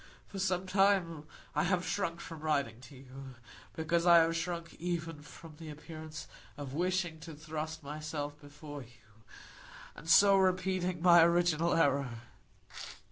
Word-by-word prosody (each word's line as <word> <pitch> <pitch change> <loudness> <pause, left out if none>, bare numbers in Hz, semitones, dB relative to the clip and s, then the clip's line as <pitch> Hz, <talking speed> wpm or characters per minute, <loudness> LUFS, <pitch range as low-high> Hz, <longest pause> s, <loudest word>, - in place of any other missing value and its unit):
"For 195 - -8
some 185 -1 0
time 185 -5 +2 0.3
I - - +1
have 180 0 +1
shrunk 170 -4 -2
from 165 -2 -8
writing 140 -7 -1
to 130 +2 -13
you, 130 0 -11 0.4
because 165 +1 0
I 170 -1 +9
have 165 0 +4
shrunk 170 0 -4
even 165 -3 -3
from 155 +1 -13
the 160 -1 -9
appearance 155 +1 -9 0.3
of 140 -2 -7
wishing 175 0 -1
to 160 0 -9
thrust 155 +1 -6
myself 150 0 -5
before 145 0 -9
you, 115 -3 -19 0.7
and 165 - -10
so 200 +2 +7
repeating 185 -2 0
my 175 -1 +8
original 170 -1 +2
error. 140 -4 +2
165 Hz, 140 wpm, -32 LUFS, 145-175 Hz, 0.7 s, I